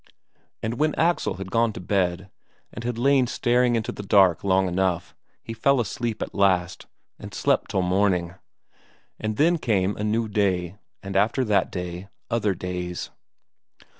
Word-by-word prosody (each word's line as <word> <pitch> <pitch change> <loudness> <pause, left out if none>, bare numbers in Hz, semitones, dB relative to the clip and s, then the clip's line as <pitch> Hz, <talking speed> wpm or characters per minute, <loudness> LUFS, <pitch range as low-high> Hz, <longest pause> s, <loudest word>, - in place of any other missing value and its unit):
And 115 +2 -3
when 155 0 +1
Axel 170 +2 +1
had 95 0 -7
gone 115 0 +2
to - - -7
bed, 95 0 -1 0.4
and 115 - -7
had 120 -1 -3
lain 135 +1 +3
staring 120 0 +2
into 110 -2 -1
the - - -7
dark 95 -4 +4
long 95 -1 +2
enough, 90 -1 -1 0.3
he 115 - -6
fell 140 +4 +2
asleep 115 +1 -2
at - - -8
last, 90 -4 +1 0.3
and - - -9
slept - - +1
till 95 - 0
morning. 90 -2 +1 0.9
And 110 0 -3
then 170 +3 +3
came 105 -6 +1
a 105 - -3
new 110 +2 0
day, 100 -3 -1 0.2
and 100 0 -6
after 110 +6 +2
that 105 -3 +1
day 90 +1 -5 0.2
other 105 -4 +1
days.... 90 0 -5
100 Hz, 160 wpm, -24 LUFS, 90-115 Hz, 0.9 s, dark